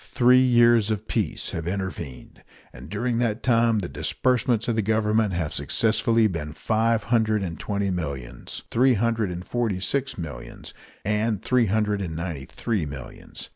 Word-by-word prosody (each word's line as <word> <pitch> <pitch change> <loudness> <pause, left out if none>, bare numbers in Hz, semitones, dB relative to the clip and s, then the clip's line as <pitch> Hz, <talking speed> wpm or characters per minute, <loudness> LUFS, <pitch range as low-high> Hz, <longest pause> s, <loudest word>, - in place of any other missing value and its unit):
Three 125 +1 +4
years 120 -3 +5
of 110 0 -2
peace 105 -9 -2
have 85 0 -4
intervened, 90 -8 -5 0.3
and 65 +5 -11
during 120 +3 -1
that 115 -1 -1
time 115 -2 +3
the 95 -4 -2
disbursements 125 0 0
of 115 - +1
the 110 - +2
Government 110 0 +1
have 85 -3 -2
successively 115 0 +2
been 80 -7 -2
five 110 +6 +1
hundred 110 -2 +1
and 80 -5 -5
twenty 100 -2 -1
millions, 70 -8 -5
three 130 +1 +4
hundred 115 -1 0
and 90 +1 -6
forty 115 -6 -1
six 135 +7 -1
millions, 75 -9 -8 0.3
and 105 0 0
three 125 -3 +2
hundred 105 0 0
and 85 -4 -4
ninety 80 -5 -4
three 105 -10 -2
millions. 70 -3 -9
105 Hz, 160 wpm, -24 LUFS, 90-115 Hz, 0.3 s, years